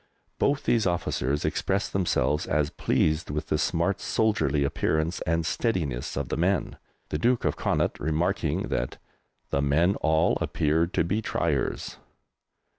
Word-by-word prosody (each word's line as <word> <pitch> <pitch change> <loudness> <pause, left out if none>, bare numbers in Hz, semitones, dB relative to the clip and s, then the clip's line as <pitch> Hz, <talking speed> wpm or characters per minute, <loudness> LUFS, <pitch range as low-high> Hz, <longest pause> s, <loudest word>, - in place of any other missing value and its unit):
Both 140 0 +1
these 115 -4 +2
officers 75 -5 -1
expressed 100 +2 -1
themselves 85 -5 +1
as 75 0 +1
pleased 80 +1 0
with 75 +1 -3
the 75 - +1
smart 85 +4 0
soldierly 105 -10 +1
appearance 80 +4 0
and 85 0 +1
steadiness 80 - -1
of 70 -3 -2
the - - -2
men, 90 +3 0 0.3
the 75 - -2
Duke 120 +6 +2
of - - +1
Connaught - - 0
remarking 80 +3 0
that - - -2 0.5
"the 70 - +1
men 80 +7 +3
all 80 +1 +2
appeared 80 +3 +1
to - - +3
be 95 +7 -1
triers." - - -1
80 Hz, 140 wpm, -27 LUFS, 75-95 Hz, 0.5 s, men